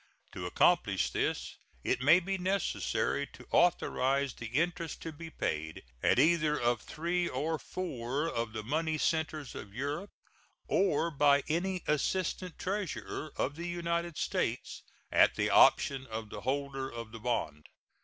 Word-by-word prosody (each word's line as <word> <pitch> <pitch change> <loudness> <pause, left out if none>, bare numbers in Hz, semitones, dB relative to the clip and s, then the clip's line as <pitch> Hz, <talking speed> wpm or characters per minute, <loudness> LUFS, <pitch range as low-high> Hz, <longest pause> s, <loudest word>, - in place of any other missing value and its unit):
To - - -5
accomplish - - +3
this - - -2 0.3
it - - 0
may 155 +7 +7
be 195 +2 -2
necessary 190 +2 0
to - - -13
authorize 140 -6 +2
the 115 - -7
interest 165 +6 -1
to 165 - -4
be 160 +2 -9
paid 80 - -3 0.2
at - - +3
either 155 +1 +4
of 120 -2 +1
three 175 +2 -1
or 155 +5 -1
four 140 -4 -3
of 115 -7 -2
the 110 -1 -4
money 155 +6 0
centers 155 -3 -1
of 100 0 -9
Europe, 145 - -3 0.6
or 170 -3 +2
by 140 -1 +4
any 180 +3 -1
assistant 180 +3 -1
treasurer 185 -5 -3
of 145 - -1
the 170 +2 -5
United 170 -1 -2
States, - - -2 0.3
at - - +5
the - - +1
option 135 -1 +5
of 110 -2 -6
the 105 - -6
holder 135 +1 -2
of 115 -1 -7
the 115 - -8
bond. 80 -11 -2
150 Hz, 145 wpm, -31 LUFS, 125-170 Hz, 0.6 s, may